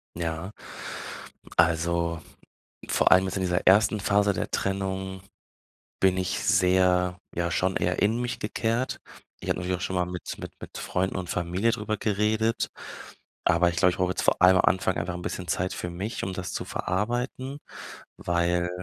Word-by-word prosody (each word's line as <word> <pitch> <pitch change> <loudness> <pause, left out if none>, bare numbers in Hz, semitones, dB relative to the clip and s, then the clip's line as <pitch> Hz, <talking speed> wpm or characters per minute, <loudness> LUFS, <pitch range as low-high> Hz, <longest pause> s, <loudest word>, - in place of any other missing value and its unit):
Ja. 85 +2 -3 1.1
Also, 85 0 +2 0.7
vor - - +3
allem 95 +1 +7
jetzt 95 +1 -2
in - - -1
dieser 90 0 0
1. 105 +2 +5
Phase 100 +1 +3
der - - -3
Trennung 95 -1 -2 0.8
bin 95 -1 +3
ich 90 -1 -1
sehr, 90 0 +3 0.2
ja, 85 0 0
schon 95 +2 +1
eher 90 - 0
in 110 +3 +2
mich 120 0 -3
gekehrt. 115 +5 -1 0.4
Ich - - -5
habe - - +1
natürlich 90 +1 -1
auch - - -10
schon 95 - -2
mal 90 - +2
mit 90 0 -6
mit - - -7
mit - - -8
Freunden 95 +1 -1
und 90 -2 -4
Familie 90 +6 0
drüber 110 -1 -2
geredet, 110 +2 +1 0.8
aber 85 +1 +4
ich 85 - -4
glaube, 90 - +5
ich 90 - -6
brauche 90 -1 +1
jetzt - - -2
vor - - +2
allem 95 0 +7
am - - +4
Anfang 95 0 +1
einfach 85 +2 -2
'n 90 - -6
bisschen 90 +1 -4
Zeit 90 +2 -1
für 90 - -4
mich, 100 +6 -4
um 95 - -2
das 90 -1 -5
zu - - -2
verarbeiten, 120 +8 -2 0.6
weil 85 0 +1
95 Hz, 175 wpm, -27 LUFS, 90-100 Hz, 1.1 s, allem